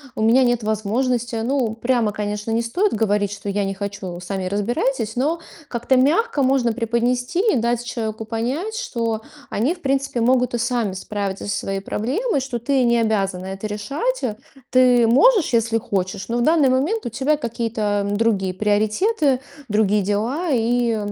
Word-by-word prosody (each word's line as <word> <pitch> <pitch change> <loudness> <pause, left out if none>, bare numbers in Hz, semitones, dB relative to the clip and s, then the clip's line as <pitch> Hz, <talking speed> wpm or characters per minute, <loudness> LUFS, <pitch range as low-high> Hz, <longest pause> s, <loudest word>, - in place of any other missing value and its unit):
"У - - -3
меня 235 +4 +5
нет 240 -2 +1
возможности". 230 +3 -1
Ну, 230 0 0
прямо, 235 -2 +1
конечно, 210 +1 -3
не 230 +1 +1
стоит 360 - 0
говорить, 205 -2 +1
что 205 0 -6
"я 200 0 0
не 195 - -2
хочу, 195 -3 -6
сами 185 +1 -4
разбирайтесь", 225 +3 -1
но 300 +7 0 0.3
как-то 240 +2 0
мягко 300 - +2
можно 255 -3 +2
преподнести 245 - 0
и - - +2
дать 235 +1 0
человеку 220 -2 -4
понять, 260 - -3
что 230 - -2 0.3
они 255 - 0
в 355 - -16
принципе 275 -3 0
могут 250 +1 +2
и 240 - +1
сами 235 -4 0
справиться 195 0 -4
со 200 - -1
своей 195 0 -3
проблемой, 275 - -1
что 260 -3 -4
ты 265 +2 +1
не 235 -1 +3
обязана 195 -5 0
это 195 +2 -5
решать, 275 - -2
э. 220 -4 -1 0.4
Ты 250 -2 +5
можешь, 350 - +4
если 230 0 +2
хочешь, 190 -2 -3
но 235 +1 -1
в - - +1
данный 305 -2 +4
момент 305 - 0
у - - -1
тебя 275 +6 0
какие-то 225 -5 -1
другие 205 -3 +1
приоритеты, 215 - +1 0.3
другие 210 -1 +2
дела. 230 - -1
И, 235 -1 +1
230 Hz, 170 wpm, -21 LUFS, 210-260 Hz, 0.4 s, меня